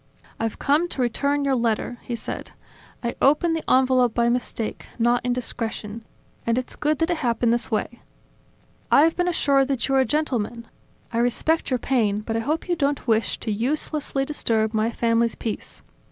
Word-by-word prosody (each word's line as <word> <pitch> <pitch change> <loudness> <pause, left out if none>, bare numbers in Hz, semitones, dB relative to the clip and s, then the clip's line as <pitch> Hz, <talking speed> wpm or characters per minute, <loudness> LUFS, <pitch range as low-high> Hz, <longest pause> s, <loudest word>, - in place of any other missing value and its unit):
"I've 225 -1 -2
come 305 +5 +2
to 265 - -3
return 280 +4 0
your 275 - +2
letter," 235 0 0
he 240 - -4
said. 230 - -6 0.5
"I 235 - -1
opened 315 +4 +4
the 320 - -3
envelope 255 -2 +4
by 235 0 +3
mistake, 240 -2 -2
not 240 +1 +2
indiscretion; 230 -3 -3 0.4
and 230 +1 +1
it's 255 - -3
good 305 0 0
that 325 +4 +1
it 345 - 0
happened 235 -3 +1
this 240 0 -1
way. 230 +2 -2 0.9
I 285 - +6
have 325 +1 +3
been 355 0 0
assured 280 -6 +2
that 270 -4 -1
you 270 - 0
are 270 - +5
a 260 - +4
gentleman. 240 -5 -1 0.5
I 230 - +1
respect 245 +7 +1
your 255 - +2
pain, 220 -5 +1
but 225 +1 -4
I - - +1
hope 305 +10 -2
you 350 - +1
don't 285 -3 -1
wish 225 -1 +1
to 220 - -2
uselessly 275 +4 -1
disturb 225 -7 0
my 220 +1 +1
family's 230 0 +1
peace. 220 - -5
245 Hz, 180 wpm, -24 LUFS, 230-285 Hz, 0.9 s, I